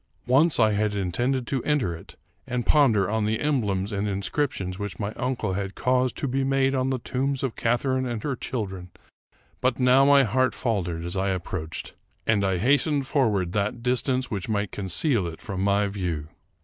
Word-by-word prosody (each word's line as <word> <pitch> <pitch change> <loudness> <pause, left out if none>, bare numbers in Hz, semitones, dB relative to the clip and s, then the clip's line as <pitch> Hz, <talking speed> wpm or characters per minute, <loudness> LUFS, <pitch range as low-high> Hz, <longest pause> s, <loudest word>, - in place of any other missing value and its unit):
Once 140 +5 +3
I 110 -2 +5
had 105 0 0
intended 120 +7 -1
to 135 -1 -2
enter 130 - 0
it, 80 - -13 0.3
and 125 -1 -2
ponder 115 -10 +4
on 110 +1 0
the 110 +1 0
emblems 105 -9 0
and 100 0 -1
inscriptions 100 -1 -2
which 105 -1 -5
my 105 0 -3
uncle 120 -6 -2
had 100 +1 -3
caused 125 0 +1
to 140 - -1
be 135 +1 0
made 135 0 +2
on 130 -1 0
the 130 - 0
tombs 135 +2 -2
of 130 -4 -2
Catharine 130 +2 0
and 115 -3 -4
her 140 -3 -1
children; 95 -8 -5 0.7
but 130 0 +1
now 130 +1 +5
my 140 0 +6
heart 130 +2 +1
faltered 90 -8 -2
as 85 - -4
I 95 +1 0
approached, 85 -3 -4 0.3
and 105 -3 +2
I 95 -2 +1
hastened 140 - +2
forward 110 - +1
that 105 +4 -2
distance 125 +1 +1 0.2
might 105 -2 -1
conceal 100 - 0
it 80 -1 -7
from 95 -3 -5
my 100 +1 +2
view. 90 -7 -3
110 Hz, 180 wpm, -25 LUFS, 95-130 Hz, 0.7 s, my